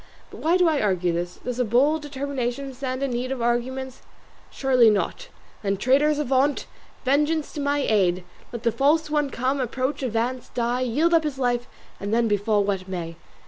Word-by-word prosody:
But - - -10
why 335 +3 +3
do 360 -1 +4
I 310 -3 +2
argue 185 -4 +1
thus? 175 +1 -3
Does 250 0 -3
a - - +3
bold 270 +8 +2
determination 275 -2 -4
stand 255 +1 -4
in 275 - -1
need 245 +2 -2
of 265 - -3
arguments? 250 +2 -2 0.5
Surely 255 -4 +4
not. 210 -2 -1 0.3
Then 195 -1 -1
traitors 285 +7 +3
avaunt! 275 0 +1 0.4
Vengeance 300 +3 +1
to 295 - -4
my 285 0 0
aid! 185 -4 +2 0.3
Let 235 -1 -6
the 230 - +2
false 300 +6 +2
one 295 -2 +1
come, 260 +2 -1
approach, 260 +3 -2
advance, 245 0 -2
die, 240 +1 0
yield 295 +8 +1
up 330 -1 +5
his 295 -3 -3
life, 245 -2 0 0.3
and 200 +1 -4
then 230 +1 +2
befall 205 0 +2
what 195 -2 -2
may. 170 -3 -5
255 Hz, 185 wpm, -24 LUFS, 225-280 Hz, 0.5 s, up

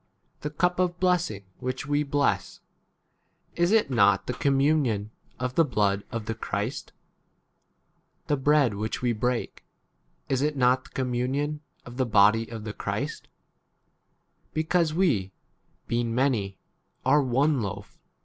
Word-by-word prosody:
16 - - -43
The 150 - -3
cup 180 +4 0
of 175 -1 0
blessing 180 - +1 0.2
which 130 +1 -4
we 145 +1 +1
bless, 145 -1 0 1.0
is 175 +2 +2
it 220 -9 +3
not 100 -5 +4
[the] 125 - -2
communion 135 -6 +1 0.3
of 125 0 -2
the 165 - +4
blood 105 -7 +1
of 115 -3 -4
the 115 - -2
Christ? 105 +2 -4 1.3
The 145 - +1
bread 145 -3 +3
which 110 +4 -4
we 120 -1 +2
break, 120 +2 -2 0.6
is 135 -1 0
it 150 0 0
not 125 0 +3
[the] - - -15
communion 135 +4 -2 0.2
of 125 0 -10
the 130 - +1
body 105 +1 +5
of 115 -2 -6
17 - - -10
the 110 - -4
Christ? - - -4 1.3
Because 160 +1 +1
we, 135 - +1 0.5
[being] 115 -1 -1
many, 115 -8 0 0.5
are 150 - +5
one 135 +2 +2
loaf 100 -3 -6
130 Hz, 140 wpm, -26 LUFS, 110-150 Hz, 1.3 s, body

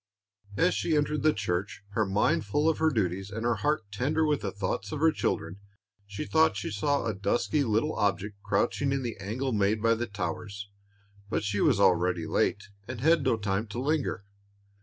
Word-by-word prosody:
As 90 - +3
she 105 - +1
entered 150 +1 0
the 155 - +4
church, 95 -2 -3
her 105 0 0
mind 95 +2 +2
full 145 +10 0
of 160 - +2
her 160 0 +4
duties 95 - -1
and 110 +2 -5
her 120 -2 +2
heart 145 +4 0
tender 145 +9 +1
with 150 -4 +1
thoughts 100 0 -3
of 150 - -3
her 160 +1 +5
children, 90 - -2 0.5
she 100 +9 -5
thought 160 -11 +3
she 100 - -4
saw 140 +6 0
a 115 - 0
dusky 105 +9 0
little 115 +6 +1
object 100 -1 -1
crouching 140 +6 0
in 135 -1 -1
the 120 -2 -4
angle 115 +7 -3
made 105 +1 +2
by 115 +1 +3
the 120 +1 -2
towers; 100 +1 -5 0.6
but - - -1
she 105 -1 -1
was 125 -10 +3
already 90 -2 +3
late, 105 - 0 0.2
and 120 -2 -6
had 160 +2 +4
no 130 -4 +2
time 100 +1 -1
to 105 +4 -5
linger. 140 -7 -1
110 Hz, 190 wpm, -28 LUFS, 100-140 Hz, 0.6 s, her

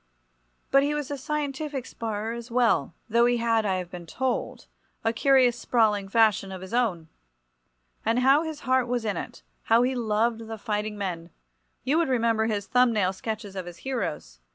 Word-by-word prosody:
But 275 - +6
he 290 +1 0
was 295 -2 -4
a - - -1
scientific 290 -1 -3
sparrer 220 0 -4
as 235 +1 -8
well, 230 - +2
though 235 +1 +4
he 245 0 +2
had, 230 -2 +1
I 190 - +1
have 180 -1 -5
been 175 -2 -8
told, 260 +7 -2 0.4
a 225 - +1
curious 255 -1 +4
sprawling 210 -4 +1
fashion 215 -2 +3
of 190 -1 -7
his 190 +3 -9
own. 205 -10 0 1.0
And 225 +2 +1
how 270 +4 +5
his 315 -2 -5
heart 260 -1 +2
was 240 -2 -1
in 205 -3 -1
it—how 230 +6 -1
he 255 +1 +1
loved 225 -1 0
the 225 0 -6
fighting 210 -1 -3
men! 175 -4 -4 0.5
You 300 +6 +2
remember 230 -5 +1
his 205 -3 -2
thumb 250 +1 +3
nail 195 -4 +1
sketches 210 0 -5
of 185 -2 -5
his 175 - -9
heroes. 180 - -4
230 Hz, 175 wpm, -26 LUFS, 205-255 Hz, 1.0 s, But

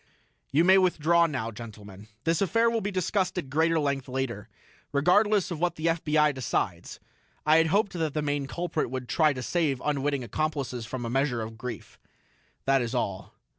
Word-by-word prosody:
"You 150 +4 +4
may 190 +2 +6
withdraw 170 -2 +3
now, 130 -7 -3
gentlemen; 105 -3 -11 0.2
this 165 +2 +1
affair 230 +5 +3
will 230 -1 0
be 205 - -2
discussed 185 0 -1
at 140 -7 -4
greater 160 +2 +2
length 140 -3 -1
later, 130 -5 -4 0.4
regardless 185 +7 +3
of 165 - -4
what 175 0 0
the 155 - -5
FBI 155 -2 +2
decides. 130 -2 -3 0.5
I 155 +1 +6
had 165 0 +4
hoped 200 +4 +1
that 160 -4 -2
the 150 - 0
main 145 -1 -1
culprit 170 -1 -2
would 130 -1 -5
try 155 +2 +3
to 130 -2 -5
save 155 -6 0
unwitting 140 -2 0
accomplices 130 -2 -3
from 120 -1 -5
a - - -3
measure 135 -3 0
of 110 +1 -7
grief. 120 -2 -8 0.7
That 135 -1 +3
is 120 -1 -3
all." 95 -1 -3
150 Hz, 180 wpm, -27 LUFS, 130-170 Hz, 0.7 s, may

